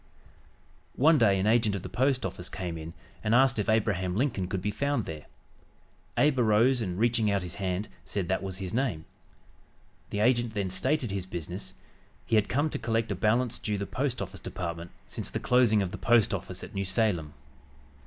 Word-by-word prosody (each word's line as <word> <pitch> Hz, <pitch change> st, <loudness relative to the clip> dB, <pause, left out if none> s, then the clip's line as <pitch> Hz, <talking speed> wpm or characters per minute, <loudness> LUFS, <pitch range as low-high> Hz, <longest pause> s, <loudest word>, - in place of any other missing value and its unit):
One 155 Hz, +3 st, +5 dB
day 100 Hz, -4 st, +4 dB
an 95 Hz, -, 0 dB
agent 110 Hz, -2 st, +3 dB
of 95 Hz, -, -5 dB
the -, -, -5 dB
Post 130 Hz, +1 st, +1 dB
Office 90 Hz, -, -4 dB
Department 90 Hz, -3 st, -4 dB
came 80 Hz, -, -6 dB
in 85 Hz, -, -9 dB, 0.3 s
and 110 Hz, +1 st, +2 dB
asked 130 Hz, -2 st, +4 dB
if 105 Hz, -, -1 dB
Abraham 100 Hz, -5 st, +1 dB
Lincoln 115 Hz, -6 st, 0 dB
could 95 Hz, 0 st, -2 dB
be 105 Hz, +3 st, -2 dB
found 140 Hz, +1 st, -1 dB
there. 75 Hz, -2 st, -7 dB, 0.9 s
Abe 145 Hz, -3 st, +3 dB
arose 120 Hz, +3 st, +4 dB
and, 90 Hz, -4 st, -3 dB
reaching 115 Hz, -1 st, +2 dB
out 100 Hz, -2 st, +1 dB
his 90 Hz, -1 st, -5 dB
hand, 95 Hz, +2 st, -1 dB, 0.2 s
said 95 Hz, -4 st, -3 dB
that 95 Hz, -, 0 dB
was 95 Hz, -1 st, -3 dB
his 95 Hz, -2 st, -5 dB
name. 115 Hz, -11 st, -1 dB, 1.0 s
The 105 Hz, -, -2 dB
agent 120 Hz, -1 st, +2 dB
then 100 Hz, -3 st, -1 dB
stated 125 Hz, +5 st, 0 dB
his 95 Hz, -2 st, -3 dB
business; 90 Hz, -2 st, -6 dB, 0.5 s
he -, -, -5 dB
had 105 Hz, -1 st, +3 dB
come 145 Hz, +4 st, +1 dB
to -, -, -3 dB
collect 115 Hz, 0 st, 0 dB
a -, -, 0 dB
balance 115 Hz, +2 st, +1 dB
due 105 Hz, -3 st, -2 dB
the 100 Hz, -, -3 dB
Post 130 Hz, +3 st, -2 dB
Office -, -, -9 dB
Department 85 Hz, -1 st, -5 dB, 0.2 s
since -, -, -4 dB
the -, -, -3 dB
closing 120 Hz, -5 st, +4 dB
of 90 Hz, -, -4 dB
the -, -, -7 dB
post 120 Hz, -3 st, +4 dB
office -, -, -5 dB
at -, -, -9 dB
New 100 Hz, -, -1 dB
Salem. 95 Hz, -6 st, 0 dB
105 Hz, 200 wpm, -28 LUFS, 95-120 Hz, 1.0 s, One